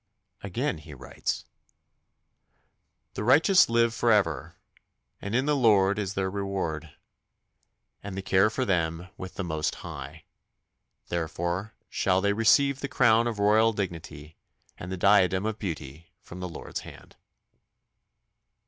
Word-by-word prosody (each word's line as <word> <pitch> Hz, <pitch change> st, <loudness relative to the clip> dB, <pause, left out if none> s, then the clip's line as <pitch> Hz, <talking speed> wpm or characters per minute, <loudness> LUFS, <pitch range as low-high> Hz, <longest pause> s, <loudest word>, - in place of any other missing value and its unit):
Again 115 Hz, -, -2 dB
he 75 Hz, -1 st, -12 dB
writes: 65 Hz, -2 st, -4 dB, 1.7 s
The -, -, -4 dB
righteous 155 Hz, -, +5 dB
live 115 Hz, 0 st, +3 dB
for 115 Hz, +1 st, +2 dB
ever, 85 Hz, -, +1 dB, 0.7 s
And 100 Hz, +3 st, -3 dB
in 130 Hz, +2 st, +2 dB
the 150 Hz, 0 st, +2 dB
Lord 105 Hz, -6 st, +3 dB
is 100 Hz, -1 st, -3 dB
their 95 Hz, -1 st, 0 dB
reward, 95 Hz, -6 st, -4 dB, 1.1 s
And 100 Hz, -1 st, -7 dB
the 95 Hz, -, -4 dB
care 95 Hz, +2 st, +3 dB
for 130 Hz, +4 st, -2 dB
them 85 Hz, -3 st, -1 dB
with 95 Hz, -, -9 dB
the 100 Hz, -, -3 dB
Most 80 Hz, -3 st, -2 dB
High. -, -, -8 dB, 0.8 s
Therefore 85 Hz, +4 st, -3 dB
shall 95 Hz, -1 st, +1 dB
they 100 Hz, +1 st, +1 dB
receive 135 Hz, +6 st, +3 dB
the 140 Hz, -, -3 dB
crown 120 Hz, -4 st, +3 dB
of 115 Hz, -3 st, -3 dB
royal 110 Hz, +2 st, +4 dB
dignity 80 Hz, -6 st, -6 dB, 0.4 s
And 90 Hz, -, -8 dB
the 95 Hz, -, -3 dB
diadem 95 Hz, 0 st, +4 dB
of 110 Hz, 0 st, -3 dB
beauty 80 Hz, -4 st, -6 dB
from 90 Hz, -, -11 dB
the 90 Hz, 0 st, -5 dB
Lord's 85 Hz, -, -6 dB
hand. -, -, -13 dB
95 Hz, 135 wpm, -27 LUFS, 85-110 Hz, 1.7 s, righteous